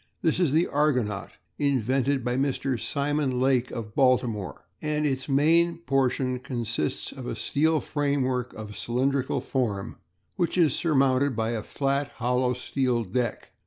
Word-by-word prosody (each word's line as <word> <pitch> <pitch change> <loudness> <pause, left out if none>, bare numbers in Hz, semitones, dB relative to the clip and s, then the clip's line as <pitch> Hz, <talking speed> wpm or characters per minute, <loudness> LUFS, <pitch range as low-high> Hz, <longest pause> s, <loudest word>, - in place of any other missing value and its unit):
This 160 +1 +2
is 175 -7 +3
the 160 +4 +3
Argonaut, 125 -9 0 0.3
invented 135 -1 +1
by 125 0 0
Mr. 135 -2 0
Simon 140 -2 -1
Lake 130 -1 +2
of 110 -2 -6
Baltimore, 125 - +1 0.2
and 150 0 0
its 135 -1 -1
main 165 +5 +3
portion 130 0 0
consists 115 - -3
of - - -8
a - - -3
steel 160 +2 +1
framework 130 -5 -1
of 105 -1 -8
cylindrical 130 +2 0
form 115 -6 -2 0.4
which 175 -1 0
is 160 -6 +4
surmounted 135 -4 +2
by 110 +1 0
a 115 -2 -2
flat, 140 +4 -1
hollow 125 +1 +1
steel 125 -2 0
deck. 115 +3 -3
130 Hz, 140 wpm, -26 LUFS, 120-145 Hz, 0.4 s, is